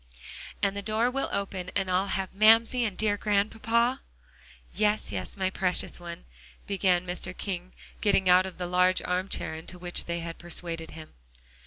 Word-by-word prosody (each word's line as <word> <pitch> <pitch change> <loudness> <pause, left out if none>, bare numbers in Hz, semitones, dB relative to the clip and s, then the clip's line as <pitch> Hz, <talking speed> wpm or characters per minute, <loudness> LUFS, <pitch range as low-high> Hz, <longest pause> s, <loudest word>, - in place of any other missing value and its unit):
"And 200 0 +2
the 200 - -3
door 220 +4 +1
will 275 +1 -1
open, 190 -2 -2
and 190 -1 0
I'll 185 +2 +2
have 190 -1 -2
Mamsie 225 +4 +5
and 205 -4 -3
dear 210 -1 +3
Grandpapa?" 225 +4 +1 0.7
"Yes, 210 - +1
yes, 95 - -2
my 190 -1 0
precious 185 -1 0
one," 170 -1 -8 0.4
began 185 -3 +1
Mr. 180 0 -4
King, 185 -2 -4 0.3
getting 195 -3 +3
out 180 +1 +6
of 185 - -10
the 180 - -3
large 180 +1 +2
arm 185 +2 -1
chair - - -2
into 160 +3 -8
which 175 0 -3
they 170 0 -3
had 165 0 -7
persuaded 170 -1 -5
him. 160 -1 -11
185 Hz, 170 wpm, -28 LUFS, 180-210 Hz, 0.7 s, out